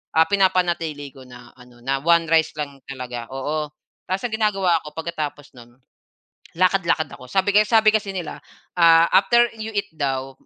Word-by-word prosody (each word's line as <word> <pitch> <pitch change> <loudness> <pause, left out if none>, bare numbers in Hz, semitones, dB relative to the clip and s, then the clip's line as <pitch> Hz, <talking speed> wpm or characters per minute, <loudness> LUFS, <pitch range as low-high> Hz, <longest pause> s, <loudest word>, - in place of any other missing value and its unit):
ah, 160 - +6
pina-panatili 175 -7 0
ko 135 - -14
na 125 -1 -14
ano, 125 -1 -18
na 135 +1 -1
1 170 0 +3
rice 160 -1 +3
lang 140 -2 -6
talaga, 125 -3 -7
oo. 150 +3 -3 0.4
Tapos 185 +4 -2
ginagawa 195 -6 +1
ko 150 0 -11
pag-katapos 155 -3 -5
no'n, 120 0 -17 0.8
lakad-lakad 180 -4 +1
ako 130 - -12
sabi 195 +1 +1
kay 210 +1 +5
sabi 220 -2 +5
kasi 205 -2 -1
nila, 170 -4 -6 0.4
ah, 165 0 +6
after 235 +5 +4
you 220 +1 -5
eat 200 - -2
daw, 135 -3 -3
160 Hz, 160 wpm, -22 LUFS, 135-190 Hz, 0.8 s, ah